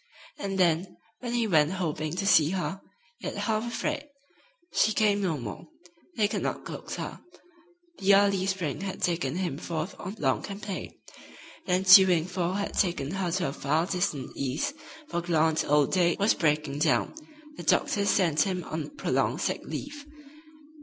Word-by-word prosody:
And 195 -1 -3
then, 180 0 +1 0.2
when 240 -1 -3
he 235 -1 +2
went 160 -4 +3
hoping 155 -3 -2
to 195 +2 -2
see 160 -6 +5
her, 190 +1 -3 0.4
yet - - -5
half 220 +1 -1
afraid, 290 +5 -3 0.6
she 215 - +3
came 205 -1 +2
no 175 -6 0
more. 115 -6 -7 0.5
They 210 -2 +3
could - - -3
not - - -3
coax - - -6
her. - - -6 0.8
The 195 0 +5
early 195 -1 +3
spring 185 -7 -2
had 195 -1 -5
taken 165 -5 0
him 175 -6 -2
forth 165 +2 -4
on 190 +3 -6
long 135 -7 +1
campaign. 200 -1 -6 0.7
The 180 - +1
ensuing 185 -2 +7
fall 180 -1 -2
had 200 +1 -2
taken 170 -7 0
her 190 -2 -1
to 180 +2 -1
the 140 - -1
far 155 +5 0
distant 175 -8 -2
East, 140 - -2 0.3
for 175 - -2
gallant 160 -2 +1
old 145 -1 +3
Dade 175 -2 +3
was 205 +1 +3
breaking 150 -2 0
down. 155 0 +2 0.4
The - - -6
doctors 200 -1 +2
sent 165 -6 +3
him 185 -3 0
on 160 - -6
prolonged - - 0
sick - - -1
leave. 285 0 -7
180 Hz, 165 wpm, -28 LUFS, 160-200 Hz, 0.8 s, ensuing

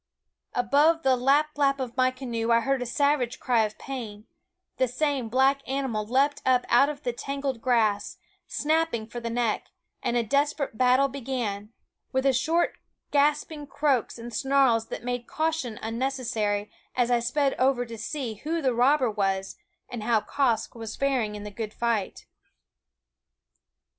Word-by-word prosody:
Above 290 +7 +3
the 265 -1 +4
lap 280 +5 +2
lap 275 -1 +3
of 250 -2 -4
my 255 -1 +3
canoe 240 -3 -3
I 230 0 +5
heard 270 +1 0
a 245 - -3
savage 275 -1 +1
cry 235 -3 +2
of 215 - -7
pain; 225 -6 -7 0.5
the 260 - +2
same 260 -1 -1
black 265 +3 +3
animal 260 -6 -2
leaped 275 +4 +2
up 255 -1 +3
out 275 +4 +5
of 295 0 -7
the 245 - -1
tangled 275 -1 -4
grass, 225 - +1 0.3
snapping 310 -7 0
for 235 +2 -7
the 235 -1 -4
neck; 230 -2 -1 0.3
and 240 - 0
a 235 - +2
desperate 280 +2 0
battle 255 +3 +4
began, 240 -6 -4 0.4
with 265 +1 0
short 325 +7 +1 0.3
gasping 295 +1 +1
croaks 280 -5 0
and 235 0 -8
snarls 265 -4 +2
that - - -6
made 245 -1 -3
caution 315 -8 -2
unnecessary 225 -4 -1 0.2
as 245 -1 +1
I 240 - +4
sped 270 +4 +1
over 255 -1 +2
to 230 -1 -8
see 240 +1 -4
who 330 +2 -1
the 265 -5 +1
robber 255 +1 +3
was, 195 -2 -1 0.3
and 240 - -6
how 225 0 +2
Quoskh 240 -5 0
was 225 -2 -7
faring 255 -7 0
in 205 - -7
the 210 - -7
good 215 +1 -6
fight. 230 -5 -1
250 Hz, 160 wpm, -26 LUFS, 230-275 Hz, 0.5 s, I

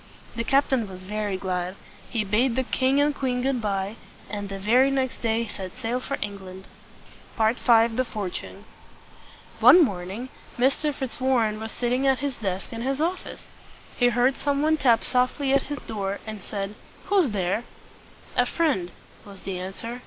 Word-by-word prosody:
The 230 - -1
captain 265 -3 +2
was 185 0 -9
very 205 0 -2
glad. 185 -1 -2 0.3
He 230 -3 0
bade 230 +5 +2
the 260 - +1
king 260 +2 +2
and 290 +1 +3
queen 250 -3 -1
good 265 -2 0
by, 200 0 -2 0.3
and 205 -2 -4
the 195 - -4
very 240 +7 +4
next 265 -2 -1
day 230 0 +1
set 190 -1 -8
sail 250 0 -1
for 275 +2 -3
England. 190 -2 -8 0.7
V. 220 0 +4
THE 235 0 +4
FORTUNE. 200 -5 -5 0.9
One 355 - +9
morning 195 +4 -5 0.3
Mr. 275 +4 +2
Fitzwarren 255 -5 0
was 220 0 -5
sitting 250 +2 0
at 265 -1 +4
his 280 0 -3
desk 195 -2 -3
in 230 - -5
his 270 +3 -1
office. 345 +4 -3 0.5
He 245 - +4
heard 245 +2 +2
some 285 0 0
one 315 +1 +3
tap 240 -6 +4
softly 255 +2 +1
at 275 - +2
his 290 - -3
door, 200 -2 -3
and 215 -1 -6
he - - -14
said, 200 -1 -3 0.3
"Who's 385 -8 +3
there?" 195 +2 -1 0.7
"A - - +3
friend," 280 - +1 0.3
was 200 -2 -13
the 185 -2 -4
answer. 210 +6 -6
230 Hz, 165 wpm, -25 LUFS, 200-265 Hz, 0.9 s, One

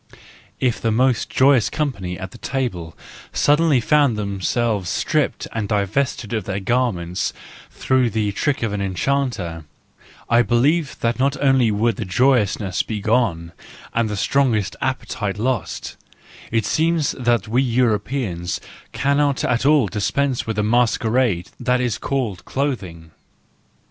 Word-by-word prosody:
If 125 -3 0
the 115 - +1
most 125 +1 +2
joyous 130 -3 +4
company 100 - -3
at 95 0 -9
table 105 -11 -3 0.4
suddenly 150 -2 +3
found 140 -2 +3
themselves 100 0 -1
stripped - - 0
and 105 -3 -3
divested 105 +2 -1
of 110 -5 -2
their 100 0 -2
garments 95 -5 -1 0.4
through 130 -2 +1
the 110 -2 -1
trick 135 +6 -1
of 110 -3 -1
an 100 - -2
enchanter, 95 - -2 0.6
I 120 +1 +4
believe 135 +6 +1
that 115 +1 0
not 140 +2 +1
only 135 -4 +3
would 110 0 +1
the 110 - -3
joyousness 105 -3 +2
be 110 -2 -4
gone 100 -7 0 0.4
and 115 -1 +1
the 105 - -3
strongest 115 -4 +1
appetite 100 -1 -2
lost;—it 115 -1 -4
seems 160 +3 +1
that 120 -3 0
we 120 +4 +2
Europeans 115 -6 0 0.3
cannot 140 +3 +1
at 125 +2 +1
all 150 -5 +5
dispense 125 +6 -1
with 110 - -2
the 105 - 0
masquerade 115 -3 +1
that 125 0 +1
is 120 -4 -1
called 125 -9 -2
clothing. 95 - -4
115 Hz, 130 wpm, -21 LUFS, 100-130 Hz, 0.6 s, all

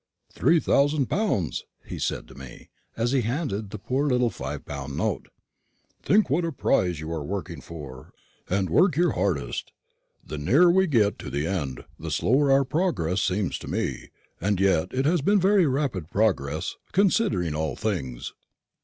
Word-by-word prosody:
"Three 165 0 +3
thousand 145 -2 +2
pounds!" 190 - 0 0.2
he - - -7
said - - -2
to - - -12
me, 65 -2 -12 0.3
as 115 +2 +1
he 135 -2 +2
handed 115 -3 -2
me - - -12
the - - -6
poor 130 +8 -1
little 125 -3 +2
five 75 +2 -6
pound 70 -1 -6
note; - - -1 0.7
"think 210 +1 +3
what 155 +7 +1
a 165 - -1
prize 90 - +1
you 80 +1 -6
are 80 -3 -3
working 90 -3 -5
for, 70 -6 -10 0.4
and 95 -2 0
work 175 - +4
your 175 0 +3
hardest. 90 -6 -2 0.5
The 75 - -6
nearer 150 - +5
we 190 +1 +3
get 110 -9 +2
to - - -6
the 70 +3 -2
end, 80 -9 -3
the - - -5
slower 135 +3 +2
our 135 0 +4
progress 125 - 0
seems 95 0 -1
to - - -9
me; - - -3 0.3
and 100 +1 +1
yet 95 -5 +2
it 130 +1 0
has 165 +1 +2
been 200 +7 +3
very 190 -2 +4
rapid 130 - -1
progress, 85 -7 0 0.2
considering 175 - +2
all 75 -3 -2
things." 70 - -3
105 Hz, 170 wpm, -25 LUFS, -, 0.7 s, nearer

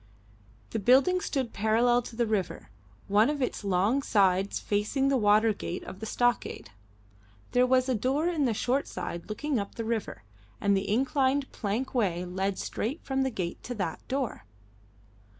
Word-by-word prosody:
The - - -1
building 275 - +4
stood 265 -8 -2
parallel 230 +4 +3
to 235 - -10
the 235 0 +1
river, 210 - -2 0.4
one 210 +5 +4
of 295 -1 -2
its 255 - -2
long 200 +7 +2
sides 195 -5 +2
facing 215 +7 0
the 275 - +3
water 215 -1 +4
gate 180 -3 -5
of 185 - -9
the 220 - -5
stockade. 245 - -1 0.8
There 250 0 +4
was 255 0 +3
a 260 - +1
door 265 +8 0
in 325 -5 +1
the 235 - +1
short 255 +6 0
side 170 +3 -6
looking 270 +4 -1
up 200 - -5
the 230 - -4
river, 220 - -3 0.4
and 200 0 +2
the 195 +1 -1
inclined 270 +3 +1
plank 220 +5 -3
way 185 -8 0
led 190 +2 -2
straight 265 +10 -3
from 270 -1 -1
the 265 - +1
gate 180 -7 -4
to 245 - -6
that 185 -7 -3
door. 260 - -3
230 Hz, 170 wpm, -28 LUFS, 200-265 Hz, 0.8 s, building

